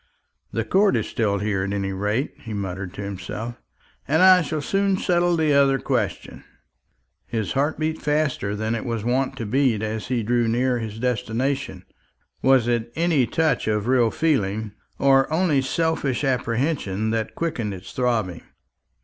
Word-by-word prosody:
"The - - -2
court 200 +1 +3
is - - 0
still 105 -5 0
here, 100 -1 -1
at 100 +1 -2
any 100 -1 -2
rate," 105 +7 -1
he 110 -2 -7
muttered 95 -2 -4
to 100 - -5
himself, 100 +4 -6 0.5
"and 160 +5 +3
I 185 -1 +8
shall 155 -1 -2
soon 195 +3 +1
settle 175 -2 +2
the 155 -2 +2
other 140 -1 +4
question." - - -3 0.8
His 110 -4 -2
heart 145 +3 0
beat 155 0 -2
faster 150 -9 0
than 110 +2 -2
it 115 - -2
was 115 -4 -3
wont 130 +2 0
to 115 - -4
beat 120 -1 +1
as 110 0 -3
he 125 -2 -1
drew 120 +1 +1
near 125 +2 +1
his 110 -1 -5
destination. 125 -3 -2 0.6
Was 130 -3 +4
it 120 -1 0
any 160 -7 +2
touch 160 -7 0
of 105 -1 0
real 125 -2 +3
feeling, 110 -8 0 0.3
or 135 +1 +4
only 160 -4 +2
selfish 145 -2 -1
apprehension, 120 -5 0
that 110 -1 -2
quickened 155 -11 -2
its 95 0 -9
throbbing? 110 -9 -1
120 Hz, 160 wpm, -23 LUFS, 110-145 Hz, 0.8 s, I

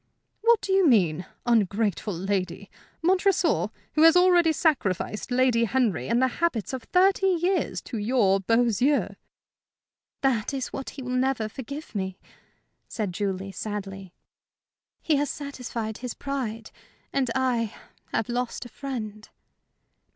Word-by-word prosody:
"What 465 -1 +4
do 385 - -1
you 385 -3 +5
mean? 180 - +3 0.2
Ungrateful 215 -3 +1
lady! 190 +1 -3 0.3
Montresor! 370 0 +2 0.3
who 305 - +2
has 330 +2 +8
already 355 -2 +5
sacrificed 255 - 0
Lady 245 -2 +3
Henry 215 - 0
and 235 - +2
the 260 - +4
habits 255 - 0
of 255 -3 -5
thirty 385 +1 +3
years 365 +1 +1
to 230 - -5
your 205 -3 +3
beaux 230 +4 +2
yeux!" 280 +3 +2 1.1
"That 265 -1 +1
is 265 - -4
what 270 - -5
he 270 - -5
will 250 - -4
never 255 -3 +1
forgive 275 +7 -8
me," 190 -2 -3 0.7
said 205 -5 -3
Julie, 195 0 -3
sadly. 195 -1 -6 0.9
"He 305 -3 +2
has 290 0 0
satisfied 245 -6 -5
his 250 -1 -5
pride, 235 -6 -4 0.4
and 265 -3 +1
I 245 -4 +1 0.4
have 225 - -1
lost 245 +1 -3
a - - -9
friend." 215 -6 -6
245 Hz, 135 wpm, -26 LUFS, 210-280 Hz, 1.1 s, has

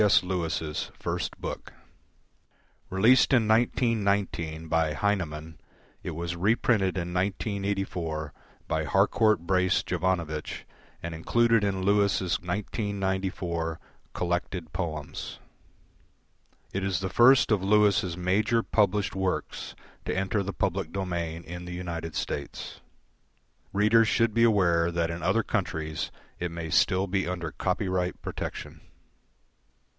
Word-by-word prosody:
S. 105 -3 +5
Lewis' 85 -4 -2
first - - -3
book. - - -6 1.2
Released 115 +9 +5
in 115 -4 +4
1919 100 -8 +1
by 80 -1 +1
Heinemann, 80 -4 -2 0.4
it - - -5
was 85 +1 -3
reprinted 100 0 +2
in 90 0 -3
1984 95 -5 -2 0.3
by - - 0
Harcourt 110 -5 +3
Brace 95 +1 +2
Jovanovich 85 -5 -2 0.4
and 85 0 -4
included 115 +7 +2
in 95 -2 0
Lewis' 100 -3 +2
1994 95 -4 -2 0.3
Collected 90 -1 -2
Poems. 75 -5 -4 1.4
It 95 - -1
is 95 -2 0
the 95 - -1
first 120 +6 +6
of 105 -3 +3
Lewis' 100 -3 +3
major 105 +6 +2
published 105 -2 +1
works 95 -1 -2 0.3
to - - -1
enter 95 +2 0
the 100 0 -3
public 95 -1 -1
domain 85 -4 -3
in 90 +2 -7
the 90 - -6
United 85 -2 -5
States. 70 -1 -4 0.9
Readers 110 +3 +4
should 115 0 +2
be 115 +1 +3
aware 85 -6 +3
that 85 -1 0
in 85 +1 -5
other - - +2
countries 80 0 -2 0.3
it 90 - -2
may 85 -1 -5
still 95 +4 +3
be 95 -1 -1
under 85 -3 -3
copyright 90 0 -1
protection. - - -6
95 Hz, 115 wpm, -27 LUFS, 85-100 Hz, 1.4 s, first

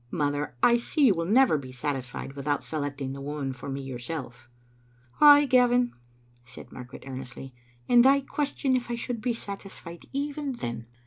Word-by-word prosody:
Mother, 145 -3 -1
I 240 0 +6
see 280 +5 +1
you 225 - +6
will 165 -1 -2
never 230 - +4
be 130 -2 -9
satisfied 130 0 -4
without 145 +1 -2
selecting 145 -3 -4
the 140 - -7
woman 140 -1 -3
for 130 +2 -8
me 135 0 -4
yourself." 125 -2 -7 0.7
"Ay, 290 -1 +9
Gavin," 245 -2 +3 0.5
said 120 0 -13
Margaret, 125 0 -10
earnestly; 130 0 -8 0.3
"and 240 -1 +6
I 275 +1 +5
ques 285 +1 -3
tion 265 -2 +2
if 245 -1 -2
I 240 - -1
should 235 -1 -4
be 240 0 -1
satisfied 195 -5 -9
even 285 0 -3
then. 120 - -5
155 Hz, 170 wpm, -27 LUFS, -, 0.7 s, Ay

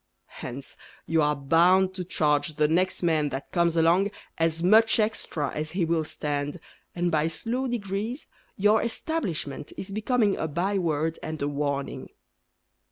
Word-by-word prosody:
Hence 130 +2 -7 0.3
You 165 -1 +2
are 150 0 +2
bound 175 +7 +4
to 185 -1 -4
charge 150 -2 0
The 150 0 +3
next 180 +4 +1
man 155 -3 +2
that 135 0 -6
comes 170 -1 +2
along 170 +5 +4 0.3
As 165 0 +1
much 220 +4 +5
extra 210 -9 -1
as 155 +1 -4
he 180 -2 +1
will 165 -1 0
stand, 145 +1 -3 0.4
And 175 0 0
by 155 -1 +2
slow 240 +10 -2
degrees 220 +2 -3 0.3
Your 210 +2 +4
establishment 200 - -2
Is 195 - -6
becoming 215 0 +1
A 160 - -1
by 185 +6 0
word 160 -2 -1
And 155 0 -5
a 140 - -1
warning. 140 -1 -3
165 Hz, 155 wpm, -26 LUFS, 150-195 Hz, 0.4 s, much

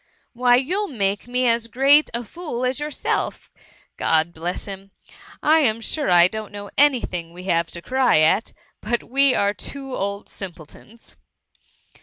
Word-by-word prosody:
Why 245 0 +4
you'll 365 +12 0
make 200 - -2
me 250 +1 0
as 230 0 +1
great 275 +5 +4
a 235 +1 -2
fool 255 -2 -5
as 255 +2 -1
yourself— 295 -1 -3 0.5
God 160 +1 +2
bless 170 +3 -4
him! 195 -1 -9 0.5
I 315 +2 +5
am 230 -7 +2
sure 290 +6 -2
I 175 -1 +7
don't 215 +2 -7
know 205 0 -9
any 280 -3 +4
thing 170 -2 -6
we 180 +1 -10
have 170 -3 0
to 170 - -9
cry 260 -5 +2
at; 160 +7 +2 0.3
but 240 +3 -1
we 275 0 +3
are 200 0 +1
two 270 +6 -5
old 200 +1 -4
simpletons. 190 +5 -12
230 Hz, 160 wpm, -22 LUFS, 190-265 Hz, 0.5 s, I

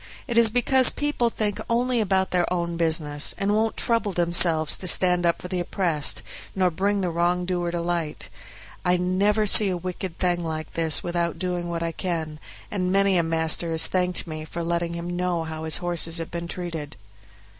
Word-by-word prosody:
It 240 - -3
is 230 -1 +7
because 250 +3 +5
people 290 -5 -1
think 210 -2 -3
only 240 0 +1
about 190 -2 +1
their 180 -1 +1
own 170 -1 -2
business, 155 -3 +1
and 200 0 0
won't 220 +1 0
trouble 230 -4 0
themselves 170 -2 +4
to 185 - -5
stand 180 -1 +4
up 170 - 0
for - - -7
the 180 0 -3
oppressed, 170 -4 0 0.3
nor 185 -2 +2
bring 200 +4 0
the 180 -2 -1
wrongdoer 175 +1 -1
to 170 0 -3
light. 170 -3 -3 0.6
I 180 0 +2
never 200 +4 +1
see 205 0 +6
a 180 - -2
wicked 180 0 -6
thing 175 -1 0
like 155 -2 -5
this 165 -2 +1
without 170 -1 -2
doing 175 -1 -3
what 170 -1 -3
I 165 - -2
can, 160 -3 -4 0.3
and 185 -3 -1
many 195 0 +2
a 175 - +3
master 165 0 -1
has 160 0 +2
thanked 180 -1 -1
me 155 -1 -7
for 170 +2 -6
letting 170 0 -2
him 175 +1 -5
know 180 -2 -1
how 160 0 -6
his 160 - 0
horses 175 -1 +2
have 165 -1 -3
been 170 0 -5
used." 165 -5 -6
175 Hz, 190 wpm, -24 LUFS, 165-190 Hz, 0.6 s, is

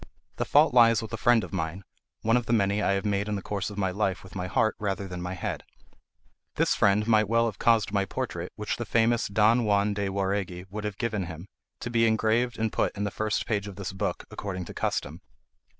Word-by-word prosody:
The - - -1
fault 150 -1 +4
lies 115 -2 +5
with 110 - -8
a - - +1
friend 115 -1 +3
of 90 - -8
mine—one 95 +6 -3
of 125 -2 0
the - - +1
many 100 -1 +2
I 100 - +2
have 100 +2 -1
made 100 0 0
in 105 - -1
the 100 - -3
course 100 -1 -3
of 100 - -9
my 95 -2 0
life 95 -2 -1
with 95 - -13
my 90 -1 -3
heart 110 +4 +1
rather 100 -2 -2
than 90 -1 -6
my 90 +1 -4
head. 90 - -4 0.9
This - - +2
friend 105 +2 +3
might 110 -2 +3
well 115 0 +3
have 110 -4 -4
caused 115 -4 +3
my 100 -1 +1
portrait, 95 -6 -4
which 105 -1 -3
the 120 - -4
famous 115 +2 +2
Don 110 +4 +3
Juan 105 -1 +2
de 100 -1 -2
Jauregui 95 -2 -2
would 105 +1 -5
have 105 -2 -4
given 110 -6 -2
him, 85 0 -8 0.4
to 120 - -4
be 115 -1 +3
engraved 110 +2 +1
and 110 -1 -1
put - - 0
in 100 - -1
the 100 - -1
first 110 +1 -1
page 105 -3 -1
of 100 - -8
this 100 -2 -5
book, 95 - -3
according 95 -3 -5
to - - -9
custom. - - -2
105 Hz, 230 wpm, -27 LUFS, 95-115 Hz, 0.9 s, lies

